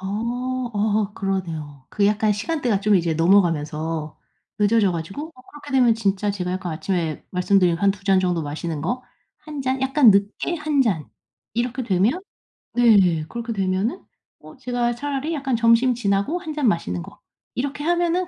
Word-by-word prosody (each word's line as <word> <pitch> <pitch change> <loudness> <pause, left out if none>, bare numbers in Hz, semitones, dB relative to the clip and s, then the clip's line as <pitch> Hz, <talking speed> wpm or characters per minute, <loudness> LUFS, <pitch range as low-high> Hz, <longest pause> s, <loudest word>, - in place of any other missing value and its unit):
어. 240 +5 -3
어 210 0 0
그러네요. 160 -8 -4
그 205 -1 +1
약간 210 +1 +2
시간대가 240 -2 -1
좀 210 0 +3
이제 170 -3 +2
넘어가면서 160 -3 +1 0.4
늦어져 210 -2 +3
가지고 185 - -5
어 255 - -17
그렇게 290 -1 -10
되면 250 -4 +4
진짜 205 -2 0
제가 180 -3 -3
약간 185 -2 -3
아침에 165 -1 -2
말씀드린 180 -1 +2
한 200 +2 +3
2 195 0 -7
잔 195 -2 +4
정도 180 -3 0
마시는 155 +1 -4
거 245 - -2 0.4
1 300 -2 -5
잔 260 0 -1
약간 265 -2 +5
늦게 200 - +1
1 300 -3 +1
잔 180 - -1 0.5
이렇게 245 +2 -1
되면 215 - +1 0.5
네. 200 -9 +4
그렇게 235 0 -4
되면은 195 - -1 0.4
어 - - -14
제가 245 -2 -1
차라리 285 +4 -3
약간 270 -4 -1
점심 230 +2 +4
지나고 220 - 0
1 320 -4 -6
잔 295 -4 0
마시는 90 - 0
거, - - -14 0.3
이렇게 285 +3 -3
하면은 345 +2 +1
210 Hz, 315 characters per minute, -22 LUFS, 185-255 Hz, 0.5 s, 약간